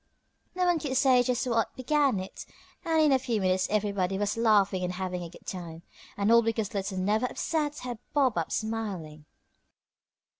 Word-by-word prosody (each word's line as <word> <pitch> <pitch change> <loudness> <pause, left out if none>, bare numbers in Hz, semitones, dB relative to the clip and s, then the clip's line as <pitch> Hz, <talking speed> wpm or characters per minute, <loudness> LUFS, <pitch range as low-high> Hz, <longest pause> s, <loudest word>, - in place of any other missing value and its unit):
No 365 0 +1
one 350 -2 +2
could 265 -4 -2
say 260 -2 +5
just 245 0 0
what 230 -3 0
began 275 -4 +1
it, 190 +1 -8 0.4
and 325 -1 +1
in 305 -2 +5
a 265 - +4
few 245 -4 -1
minutes 185 -1 +1
everybody 200 -3 0
was 205 0 -1
laughing 205 -5 +3
and 180 0 -2
having 180 -1 -3
a 170 - -6
good - - -16
time, 170 -3 -7 0.3
and 200 +2 +2
all 235 0 +7
because 225 -2 -2
Little 195 -1 -3
Never 210 +6 +1
upset 300 +1 -2
had 245 -3 -6
bobbed 265 - +2
up 165 - -4
smiling. 195 -9 -4
215 Hz, 180 wpm, -28 LUFS, 190-255 Hz, 0.4 s, all